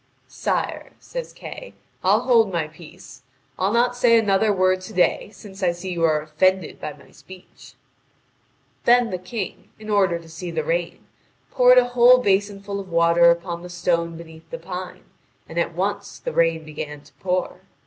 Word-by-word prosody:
"Sire," - - -3
says - - -7
Kay, - - -10 0.3
"I'll - - +4
hold 230 -5 +3
my 165 -3 -1
peace. 155 -4 -14 0.4
I'll 190 +2 +1
not 240 +2 +2
say 240 -1 +4
another 210 -1 +2
word 185 -1 +2
to 185 - -10
day, 180 +2 +1
since 200 -2 -13
I 175 -2 +2
see 180 +2 -6
you 170 -2 -2
are 155 -2 +1
offended 185 +3 0
by 150 - -5
my 140 -1 -19
speech." 185 -1 -15 1.1
Then 240 -1 +4
the 185 - -3
King, 190 +2 -6
in 215 0 -7
order 190 -4 +3
to 165 -1 -13
see 165 +2 -7
the 160 -2 -2
rain, 170 +2 -2 0.5
poured 250 0 +6
a 245 -1 +5
whole 245 +1 +6
basin 200 -3 0
full 200 0 -4
of 195 -1 -8
water 170 0 +5
upon 170 0 -1
the 180 - -9
stone 170 -1 -1
beneath 160 -1 -13
the 245 - -5
pine, 180 -4 -7 0.4
and 165 - -4
at 170 -1 -1
once 200 +2 -3
the - - -5
rain 165 -1 +2
began 150 -1 -7
to 145 - -22
pour. 185 0 -2
185 Hz, 180 wpm, -22 LUFS, 170-205 Hz, 1.1 s, poured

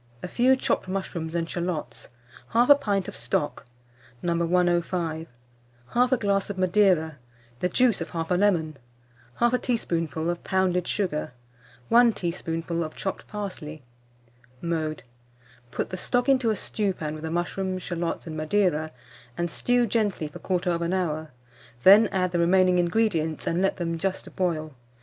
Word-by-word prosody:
A - - -3
few 250 +7 +4
chopped 260 - -1
mushrooms 175 -4 -4
and 165 -1 0
shalots, 170 -9 -4 0.4
1/2 250 +5 +6
pint 200 -6 0
of - - -7
stock, 125 +8 -2 0.6
No. 170 -1 +1
105, 170 -1 0 0.6
1/2 250 +1 +3
glass 200 -1 +1
of 200 - -4
Madeira, 185 -5 +3 0.4
the 180 - 0
juice 245 +2 +2
of - - -4
1/2 170 +1 -1
lemon, 165 -7 +2 0.6
1/2 240 +1 +3
teaspoonful 165 - -1
of 175 - -6
pounded 185 -2 +1
sugar, 165 -10 -2 0.6
1 235 0 +6
teaspoonful 170 -2 -3
of 155 - -7
chopped 190 - -4
parsley. 185 -8 -6 0.8
Mode. 160 -2 -2 0.7
Put - - -3
the 185 - -5
stock 245 +7 0
into 260 -4 +3
a 215 - +2
stewpan 190 -9 -2
with 155 0 -8
the 160 - -3
mushrooms, 185 +2 -2
shalots, 170 -1 -3
and 160 -2 -6
Madeira, 160 -1 +1 0.5
and 170 -1 -1
stew 245 +5 +2
gently 205 -8 0
for 150 - -10
1/4 175 -1 0
hour, 160 -4 -2 0.5
then 210 +3 +8
add 185 -2 0
the 175 - 0
remaining 180 +1 +4
ingredients, 170 -4 0
and 170 +2 0
let 195 - +1
them 165 -2 -2
just 190 +2 -3
boil. 155 -4 -1
180 Hz, 145 wpm, -26 LUFS, 165-200 Hz, 0.8 s, then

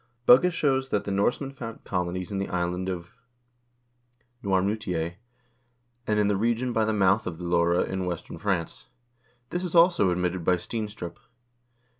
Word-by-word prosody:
Bugge 135 +9 +7
shows 135 -5 +1
that 105 - 0
the 100 - -4
Norsemen 120 +7 0
founded 115 -4 -8
colonies 90 0 -3
in 100 - -2
the 100 - -3
island 90 +1 -1
of 85 -2 -5 1.3
Noirmoutier, 95 -3 -1 0.9
and 105 0 +2
in 105 - +3
the 105 - +2
region 120 +4 0
by 110 -1 +2
the 110 - +1
mouth 100 0 +2
of 85 -2 -4
the 90 - -8
Loire 85 0 +2
in 95 -1 -3
western 90 -2 -5
France. 95 -5 -2 0.6
This 175 +1 -2
is 180 -1 -3
also 170 - +5
admitted 90 0 -1
by 90 +2 +3
Steenstrup. 105 -2 -5
100 Hz, 155 wpm, -26 LUFS, 90-115 Hz, 1.3 s, Bugge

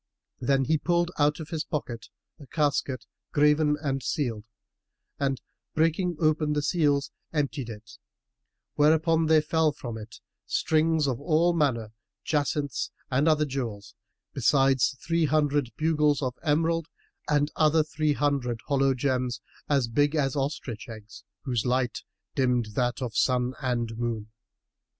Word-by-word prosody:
Then 135 +2 +2
he 155 +3 +2
pulled 175 +2 +1
out 150 +1 +3
of 155 - -7
his 160 -2 -2
pocket 120 -8 -5 0.3
a 145 - -12
casket, 140 -4 0 0.3
graven 150 0 +3
and 135 -2 -1
sealed 120 -7 -2 0.7
and, 135 -2 0 0.4
breaking 165 +3 +1
open 155 -1 +2
the 150 -1 0
seals, 145 -5 +1 0.2
emptied 140 -5 -2
it; 110 -1 -11 0.7
whereupon 160 +2 +3
there 155 -1 +5
fell 160 0 +2
from 120 -5 -7
it 110 +1 -10 0.3
strings 160 -1 +2
of 130 -2 -1
all 165 +3 +3
manner 125 -9 0 0.3
jacinths 145 -2 -1 0.2
and 135 +4 +2
other 155 -1 +4
jewels, 120 -8 -5 0.4
besides 135 -1 +3
three 165 -1 +2
hundred 145 -3 +1
bugles 150 -2 +2
of 130 -1 -1
emerald 165 +2 +1 0.4
and 145 0 +2
other 155 0 +4
three 150 0 0
hundred 140 -6 0
hollow 135 -2 +2
gems, 125 -1 -1 0.3
as 140 -4 +2
big 145 +6 +2
as 135 -3 +1
ostrich 135 -5 -3
eggs, 110 -1 -11 0.2
whose 120 -4 -1
light 125 0 0 0.3
dimmed 125 -4 +1
that 120 +2 0
of 120 -3 -4
sun 125 +2 +2
and 120 -3 -1
moon. 115 -3 -3
145 Hz, 135 wpm, -27 LUFS, 125-155 Hz, 0.7 s, there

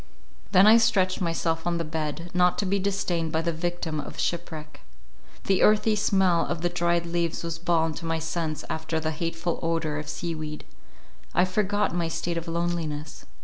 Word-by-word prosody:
Then 190 0 +7
I 220 +2 +8
stretched 195 -6 +2
myself 165 -1 -1
on 170 -1 +1
the 165 - -1
bed, 160 +2 -4
not 180 0 +3
to 205 - 0
be 195 +1 +1
disdained 185 -4 -1
by 160 +1 0
the 170 0 0
victim 165 -1 -2
of 145 - -7
shipwreck. 160 -3 -3 0.6
The 195 -1 +2
earthy 215 +1 +4
smell 190 -4 +3
of 170 -2 -3
the 175 - +2
dried 170 -1 +1
leaves 170 -1 -1
was 165 -1 -4
balm 165 -2 +1
to 165 +3 -7
my 165 0 0
sense 160 -1 -3
after 160 0 -2
the 155 0 -1
hateful 165 +1 -2
odour 165 -2 -1
of 150 - -7
sea 170 -1 -3
weed. 155 -1 -6 0.7
I 180 - +5
forgot 205 +1 0
my 175 -1 0
state 165 +1 -2
of 170 +1 -4
loneliness. 165 - -3
170 Hz, 185 wpm, -26 LUFS, 160-180 Hz, 0.7 s, I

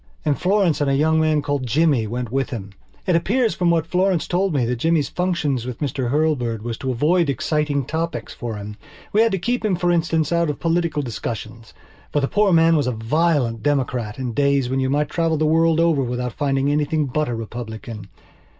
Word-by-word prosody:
And 150 -2 +2
Florence 185 -5 +2
and 145 - +2
a 135 - +2
young 160 +3 +3
man 155 -2 +2
called 140 -3 -2
Jimmy 140 -3 +2
went 120 +1 -4
with 135 +1 -1
him. 100 -7 -6 0.3
It 180 - +2
appears 225 +7 +1
from 175 -1 +1
what 165 -2 +2
Florence 180 0 +1
told 190 +2 +1
me 135 -6 +1
that 125 +1 -1
Jimmy's 160 +3 +1
function 175 -5 -1
with 125 0 -5
Mr 130 -4 -2
Hurlbird 125 -7 0
was 120 -1 -3
to 130 - -3
avoid 150 +6 +2
exciting 145 -1 0
topics 165 +4 -3
for 120 -3 -5
him. 105 0 -8 0.4
He 210 - +3
had 225 0 +4
to 195 - 0
keep 240 +7 -1
him, 210 -4 +1
for 175 0 +1
instance, 165 -2 +1
out 170 -1 +2
of 150 - -3
political 165 -2 0
discussions. 115 -1 -6 0.4
For 145 - +1
the 135 - 0
poor 210 +6 +2
old 185 - +4
man 165 0 +5
was 145 -4 +1
a - - +1
violent 120 0 0
Democrat 125 -6 -1
in 125 -3 -3
days 140 -1 +1
when 135 - 0
you 130 0 0
might 145 +2 +1
travel 165 -2 0
the 155 - +1
world 165 +1 +3
over 165 -4 +3
without 125 -1 -3
finding 140 0 0
anything 150 +1 +1
but 150 +2 -1
a 120 - -2
Republican. 110 -2 -7
145 Hz, 215 wpm, -21 LUFS, 125-165 Hz, 0.4 s, man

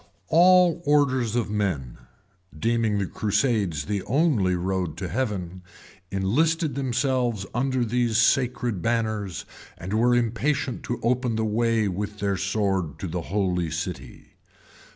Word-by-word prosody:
All 175 0 +5
orders 130 -6 +2
of 115 -4 -1
men, 90 -13 -2 0.6
deeming 115 +2 +1
the 100 - 0
crusades 100 - 0
the 100 +3 -2
only 120 - +2
road 90 -2 -2
to 95 - -4
heaven, 95 -4 -3 0.5
enlisted 150 - +1
themselves 125 -5 0
under 130 0 0
these 120 -1 +1
sacred 120 -3 +1
banners, 110 - -1 0.3
and 95 +4 -6
were 120 +3 +3
impatient 125 +3 0
to 120 - -3
open 125 0 +1
the 110 0 0
way 115 0 +1
with 105 +2 -4
their 100 -1 0
sword 95 -5 -1
to 95 - -5
the 85 +1 -3
holy 90 -4 0
city. 80 -5 -6
110 Hz, 130 wpm, -25 LUFS, 95-125 Hz, 0.6 s, All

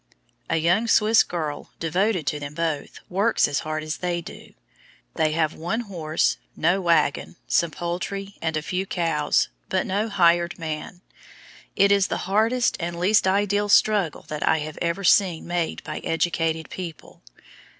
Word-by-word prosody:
A - - +1
young 175 +8 +2
Swiss 220 0 +5
girl, 155 -4 -4
devoted 180 +1 0
to 150 - -1
them 145 0 -7
both, 160 -3 -3
works 200 +5 +2
as 145 - -1
hard 155 0 -4
as 155 0 -4
they 175 -1 -2
do. 170 - -11 0.6
They 155 -1 +1
have 160 -1 +1
one 195 +9 -2
horse, 165 -8 -1 0.2
no 175 +4 +2
wagon, 165 -3 +1
some 170 - +2
poultry, 185 +4 -4
and 160 -1 -1
a 155 - -3
few 185 +4 -2
cows, 165 -5 +1 0.2
but - - 0
no 205 +4 -1
"hired 175 -3 +3
man." 160 +1 -6 0.7
It 200 +1 +4
is 200 -2 +4
the - - -3
hardest 225 +6 +2
and 170 -1 -4
least 195 +2 +3
ideal 205 +1 +1
struggle 205 -6 +3
that 150 -1 -5
I 160 - +3
have 155 0 -7
ever 170 +3 -1
seen 185 -3 +3
made 175 -1 -2
by - - -5
educated 165 -1 -1
people. 170 -4 -8
175 Hz, 160 wpm, -24 LUFS, 160-195 Hz, 0.7 s, Swiss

